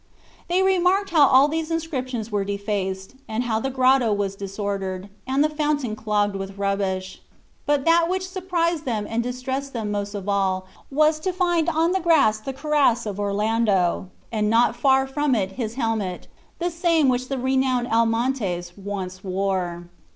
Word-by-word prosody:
They 360 +2 +2
remarked 380 +1 +2
how 300 -4 +6
all 265 +3 +6
these 320 +1 -2
inscriptions 260 -9 -3
were 205 -1 0
defaced, 200 -1 -3
and 220 +3 -2
how 225 -3 0
the 270 - -2
grotto 260 -2 +3
was 200 -1 -1
disordered, 195 -1 -4 0.2
and 270 +2 +2
the - - +4
fountain 295 -6 -1
clogged 210 -2 0
with 195 0 -6
rubbish. 195 -1 -2 0.5
But 290 -2 +1
that 335 0 +4
which 375 0 -1
surprised 345 -4 -1
them 220 -5 -1
and 225 +1 -1
distressed 260 +3 -4
them 220 -4 -3
most 205 0 -3
of 200 -1 -6
all 190 -2 0 0.2
was 305 +2 +3
to 370 +4 -1
find 350 -2 +1
on 325 +1 +2
the 380 - +1
grass 315 -11 +3
the 245 +5 -5
cuirass 275 -4 +1
of 205 -1 -4
Orlando, 205 -3 +1 0.2
and 210 -2 0
not 235 +1 +3
far 265 +1 +3
from 275 0 0
it 195 -3 -1
his 230 0 -4
helmet, 220 -7 -2 0.3
the 350 +1 -1
same 335 -3 +2
which 255 0 +1
the 270 - -2
renowned 260 -1 +1
Almontes 225 -7 0
once 190 -2 -6
wore. 185 -2 -2
235 Hz, 165 wpm, -23 LUFS, 200-295 Hz, 0.5 s, how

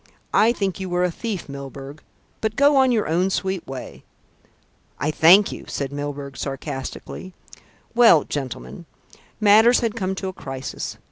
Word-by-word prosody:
I 225 +2 +5
think 195 -6 -2
you 190 -1 -4
were 175 0 0
a 180 - +1
thief, 205 0 -5
Milburgh; 140 +1 -9 0.4
but 220 -1 -1
go 285 +1 +4
on 265 -1 +4
your 220 -3 +1
own 175 +4 +1
sweet 190 -1 -2
way." 135 -1 -8 0.9
"I 150 +3 -1
thank 180 +7 +6
you," - - -8
said 140 -1 -4
Mr. - - -7
Milburgh 145 -1 -5
sarcastically. 140 +6 -6 0.6
"Well, 230 -10 +6
gentlemen, 145 +4 -6 0.5
matters 220 +3 +6
had 230 -3 0
come 190 -3 -2
to 190 - -4
a 190 - -4
crisis. 135 -5 -6
180 Hz, 155 wpm, -22 LUFS, 140-210 Hz, 0.9 s, thank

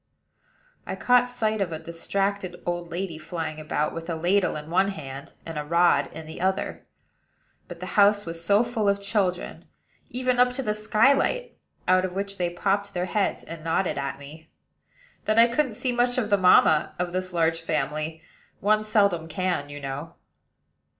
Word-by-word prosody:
I - - -3
caught 245 0 +3
sight 220 -3 -1
of 185 -3 -1
a 160 - -3
distracted 185 +3 -3
old 175 -1 -3
lady 170 -2 -4
flying 160 -1 -5
about, 155 0 -1
with 165 +1 -6
a 165 - -1
ladle 180 +4 +1
in 150 +1 -7
one 190 +3 +3
hand, 140 -8 -7
and 165 -2 -5
a - - -3
rod 155 -3 +3
in 160 0 -9
the 160 +2 -9
other; 190 +1 -1 0.8
but 175 -1 -9
the - - -4 0.2
house 205 0 +4
was 165 0 -4
so 200 +6 +4
full 230 -4 0
of 200 0 +1
children 200 -3 -1 0.4
(even 255 0 0
up 250 0 +4
to 270 - -3
the 210 - 0
skylight, 270 - +2 0.3
out 185 0 +4
of 185 -1 -3
which 200 0 -4
they 175 -1 +1
popped 200 +3 -1
their 180 0 0
heads, 200 +3 -1
and 165 -1 -9
nodded 165 -1 0
at 140 0 -3
me) 155 +3 -12 0.8
that 215 +1 +1
I 230 - +9
couldn't 240 0 0
see 255 +3 -1
much 245 +1 +1
of 215 -4 -1
the - - +7
mamma 180 -4 +5
of 180 0 -2
this 185 +1 -3
large 165 -1 +1
family: 155 +1 -2 0.4
one 215 +2 +2
seldom 200 -6 +2
can, 175 -3 -2
you 145 0 -7
know. 140 +4 -6
180 Hz, 180 wpm, -25 LUFS, 160-210 Hz, 0.8 s, I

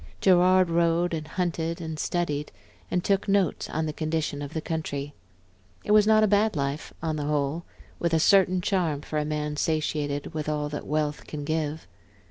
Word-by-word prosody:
Gerard 185 -1 +4
rode 170 +1 +2
and 155 -1 -3
hunted 170 -2 -2
and 160 -2 -5
studied, 150 -4 -1 0.4
and 180 - 0
took 195 0 +1
notes 195 -5 +1
on 160 0 -1
the 155 - -3
condition 155 -2 -2
of 145 +2 -7
the - - 0
country. 145 -3 -4 0.7
It - - -2
was 210 0 +6
not 215 0 +5
a - - +5
bad 210 0 +2
life 140 +1 -2
on 160 -1 -1
the 145 - -3
whole, 150 +2 -1 0.3
with 170 - 0
a - - +3
certain 185 +1 +4
charm 175 -7 0
for 155 +1 -3
a 150 - -1
man 150 0 -2
satiated 150 -1 -1
with 155 -1 -3
all 150 -1 -1
that 145 - -6
wealth 150 0 -1
can 150 -1 -5
give. 155 0 -2
160 Hz, 185 wpm, -26 LUFS, 150-175 Hz, 0.7 s, was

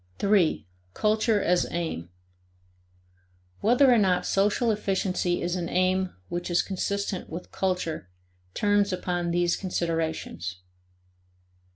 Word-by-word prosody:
3. 190 - +2 0.3
Culture 215 0 +2
as 180 0 +2
Aim. 160 - -3 1.5
Whether 250 +4 +5
or 235 - +5
not 180 -3 +2
social 210 +4 +2
efficiency 190 -3 0
is 175 +1 -1
an 175 -2 -3
aim 185 0 +1
which 175 +1 -4
is 175 - +2
consistent 200 0 -3
with 170 +2 -7
culture 180 - -2 0.5
turns 205 -1 +2
upon 175 -1 -2
these 175 0 +2
considerations. 165 - -2
185 Hz, 105 wpm, -26 LUFS, 175-200 Hz, 1.5 s, Whether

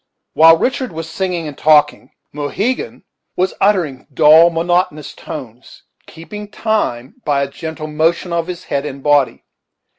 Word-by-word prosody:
While 165 +1 +7
Richard 260 - -1
was 165 0 -6
singing 175 -1 -3
and 145 - -7
talking, 150 0 +3 0.2
Mohegan 205 - -3 0.3
was 185 +1 0
uttering 175 -10 +1
dull, 155 +4 +6
monotonous 170 -2 -1
tones, 130 -6 -10 0.2
keeping 210 +6 -9
time 215 - -2
by 140 -2 +1
a - - -2
gentle 160 +2 -7
motion 165 +3 0
of 170 -1 -1
his 180 -1 -6
head 140 - -2
and 140 -2 -7
body. 145 -3 +2
160 Hz, 140 wpm, -17 LUFS, 145-180 Hz, 0.3 s, While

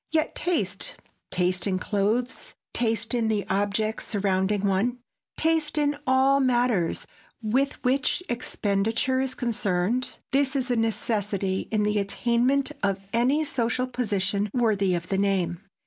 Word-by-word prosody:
Yet 315 0 +1
taste,—taste 185 - -2
in 185 -1 +1
clothes, 215 +6 -1 0.2
taste 225 -1 0
in 235 -2 +1
the 215 -2 0
objects 205 +2 0
surrounding 195 0 0
one, 200 +6 +1 0.4
taste 320 -1 +1
in 290 -1 +2
all 265 +1 +4
matters 245 -9 +1 0.4
with 265 +6 +1
which 270 +7 +1
expenditure 230 +2 0
is 265 -1 -2
concerned,—this 245 +6 -1
is 260 -2 0
a - - +3
necessity 205 -4 -1
in 215 -1 +1
the 210 0 +1
attainment 245 +7 +1
of 195 -1 +1
any 260 +7 +3
social 245 -2 0
position 205 -5 -1
worthy 205 -6 +2
of 170 0 -4
the 195 - +1
name. 190 -3 0
225 Hz, 125 wpm, -26 LUFS, 200-255 Hz, 0.4 s, all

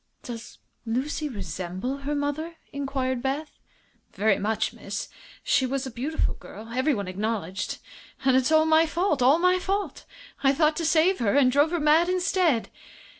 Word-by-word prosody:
"Does 235 -2 -8 0.3
Lucy 265 +6 -2
resemble 190 - -4
her 285 +1 -3
mother?" 290 +4 -2 0.2
inquired 265 -3 -2
Beth. 275 +4 -3 0.5
"Very 205 +1 +2
much, 220 +1 -1
miss. 200 0 -6 0.3
She 265 -2 +2
was 270 +1 -2
a 260 - -6
beautiful 275 +7 -1
girl, 220 +2 -11
everyone 250 -4 0
acknowledged. 195 -1 -3 0.5
And 265 -1 +5
it's 260 +3 +2
all 315 0 +5
my 320 +1 +4
fault 335 -3 0
all 265 +5 +6
my 365 +1 +3
fault. 395 +2 -3 0.4
I 270 0 +5
thought 305 +1 +2
to 335 - -1
save 330 +4 +3
her, 210 -4 +1
and 265 -3 +5
drove 290 +4 +4
her 345 +1 -1
mad, 310 +3 +4
instead!" 360 - +1
275 Hz, 160 wpm, -26 LUFS, 230-315 Hz, 0.5 s, all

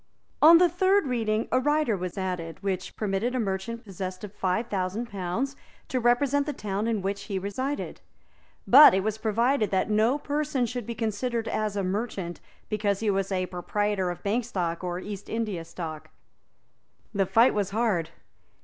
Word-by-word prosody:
On 330 +2 +9
the 355 +1 +6
third 375 +2 +2
reading 225 -4 0
a 255 - +4
rider 295 -4 +2
was 185 0 -5
added, 180 -3 -4
which 190 -2 -3
permitted 215 +4 -1
a - - 0
merchant 220 +3 -3
possessed 185 -2 -6
of 205 -1 -7
five 190 +5 0
thousand 205 +3 -3
pounds 200 +9 -2 0.3
to 255 - 0
represent 275 +4 +2
the 295 - -1
town 205 -1 -3
in 220 -4 -1
which 200 +1 -3
he 200 -3 -3
resided; 255 +9 -3 0.6
but 275 -5 +9
it 190 - +1
was 215 +1 -2
provided 230 +2 +1
that 190 +2 0
no 220 +6 +3
person 290 -3 -1
should 245 -2 -5
be 235 - -4
considered 225 +1 -2
as 215 -1 -1
a 200 - -1
merchant 190 -3 -3 0.3
because 205 -2 -1
he 215 -2 +2
was 195 0 -1
a 185 -1 0
proprietor 190 +1 -1
of 175 0 -6
Bank 220 +5 0
Stock 180 -7 -3
or 175 -1 -2
East 200 +1 -7
India 215 -7 -2
Stock. 160 -2 -7 1.0
The 195 -2 +1
fight 230 +6 +5
was 205 -2 0
hard. 200 -6 0
210 Hz, 175 wpm, -27 LUFS, 190-240 Hz, 1.0 s, On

